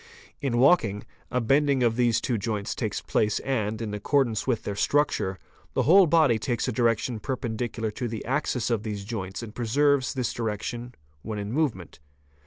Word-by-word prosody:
In 130 -5 0
walking, 120 - +4 0.3
a 125 - 0
bending 135 +2 +2
of 115 -1 +2
these 120 -2 +3
two 120 -4 -1
joints 105 -1 -2
takes - - -3
place 105 -1 +1
and, 110 -5 -1
in 105 -2 -4
accordance 115 +2 +1
with 125 -4 0
their 100 - -3
structure, 105 -6 +1 0.4
the - - +2
whole 185 +3 +7
body 150 -8 +4
takes 120 +3 -1
a - - 0
direction 115 0 +1
perpendicular 115 -2 -3
to 120 +3 -4
the 110 -2 -5
axis 125 -2 -1
of 115 -3 +1
these 105 -2 -5
joints 95 -1 -5
and 110 -2 -8
preserves 130 +4 +1
this 125 -2 -1
direction 115 +2 -4 0.3
when 110 +4 -5
in 100 +1 -4
movement. 125 - -2
115 Hz, 175 wpm, -26 LUFS, 105-130 Hz, 0.4 s, whole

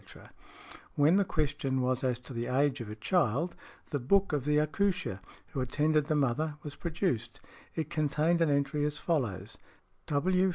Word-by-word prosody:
When 145 +3 +5
|106| - - +5
the 200 - +2
question 145 -5 -1
was 130 +1 0
as 125 -2 +1
to 130 - -9
the 120 0 -3
age 140 0 +1
of 110 - -6
a 105 - -6
child, 145 - +1 0.4
the 145 - 0
book 190 +9 +2
of 140 -3 0
the 150 0 +3
accoucheur 180 - 0 0.3
who 135 - -3
attended 150 +3 +1
the 155 - +1
mother 145 +2 +1
was 145 -1 -7
produced; 155 - -2 0.4
it 160 -2 -3
contained 155 +3 +1
an 165 - +4
entry 140 +1 +1
as 150 0 -1
follows, 105 - -2 0.5
"W. 185 +6 +2
145 Hz, 170 wpm, -31 LUFS, 130-160 Hz, 0.5 s, When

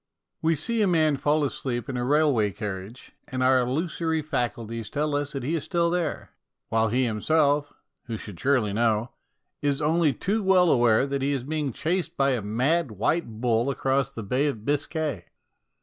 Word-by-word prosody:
We 160 0 +2
see 225 +10 -1
a 205 - +3
man 155 -4 +3
fall 150 +2 +1
asleep 125 -4 -3
in 135 - -4
a 125 - -1
railway 140 -6 +3
carriage, 100 +4 -7 0.2
and 130 -1 -2
our 130 0 +5
illusory 160 +5 -1
faculties 115 -6 -3
tell 150 +1 -1
us 145 +1 -2
that 135 -3 -4
he 145 +6 -1
is 165 - -1
still 170 -1 +1
there, 175 -1 -2 0.4
while 110 0 +2
he 125 +4 +1
himself, 145 +5 +1 0.3
who 115 -2 -4
should 105 -5 -9
surely 125 -7 +1
know, 115 +1 +1 0.5
is 140 -1 0
only 155 0 +2
too 210 +9 -1
well 185 -3 +4
aware 120 0 +4
that 140 0 -2
he 140 +1 +1
is 135 -3 -2
being 150 0 -2
chased 175 - -2
by 140 0 +3
a 125 -3 0
mad, 130 +10 +1
white 110 - -1
bull 120 +1 +2
across 135 0 0
the 115 -5 -7
Bay 130 +8 +1
of 115 -7 -4
Biscay. 145 - -1
140 Hz, 180 wpm, -26 LUFS, 115-155 Hz, 0.5 s, our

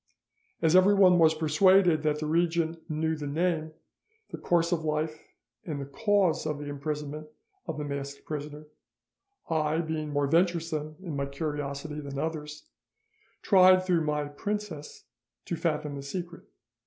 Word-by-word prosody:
As 160 +1 +4
everyone 185 -1 +6
was 160 -1 +5
persuaded 165 +2 +4
that 150 -1 0
the 155 - -4
regent 165 0 0
knew 160 +1 0
the 150 -2 -5
name, 160 +1 -1 0.6
the - - -6
course 170 0 +1
of 165 -2 0
life, 155 0 -2 0.4
and 150 -4 -4
the 140 - -4
cause 195 0 +1
of 150 -2 -2
the 145 - -7
imprisonment 150 +1 -5 0.4
of 160 - -4
the 150 - -3
masked 140 -1 -6
prisoner, 150 0 -6 0.8
I, 155 -1 0
being 160 -2 -3
more 145 -1 0
venturesome 160 -1 0
in 165 -6 -5
my 140 0 -2
curiosity 145 0 -4
than 140 -2 -7
others, 150 - -4 0.8
tried 185 -1 +6
through 175 -3 +2
my 150 -1 0
princess 175 0 -5 0.4
to 170 - -2
fathom 155 -3 -2
the 140 - -6
secret. 170 +4 -6
155 Hz, 145 wpm, -28 LUFS, 150-170 Hz, 0.8 s, everyone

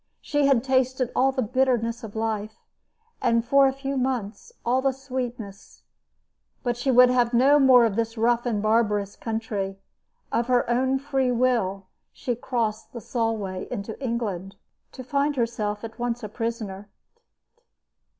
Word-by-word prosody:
She 290 -1 +1
had 260 -4 +3
tasted 260 -1 +1
all 265 +1 +3
the 260 -1 -1
bitterness 240 -1 0
of 220 -1 -8
life, 220 -1 -2 0.7
and 230 -2 +2
for 275 +2 +5
a - - +2
few 275 +1 -4
months 255 - -3
all 250 +2 +2
the 270 0 +1
sweetness; 245 -6 -7 0.8
but 245 -1 0
she 245 +3 -2
would 250 0 +7
have 245 -1 +2
no 275 +4 +5
more 255 -3 +7
of 215 -4 -1
this 225 +1 -2
rough 240 +2 +2
and 215 -3 -1
barbarous 210 -2 +1
country. 220 -4 -3 0.5
Of 235 - 0
her 250 -1 +2
own 260 +3 +1
free 270 -2 0
will 230 -6 +1 0.3
she 245 -3 -3
crossed 230 -3 -3
the 235 - -6
Solway 220 -5 -2
into 205 +5 -6
England, 205 -6 -3 0.4
to 255 - -8
find 285 +3 0
herself 215 -4 -2
at 225 +1 -8
once 240 0 -2
a 215 - -5
prisoner. 215 -3 -5
235 Hz, 150 wpm, -25 LUFS, 220-260 Hz, 0.8 s, would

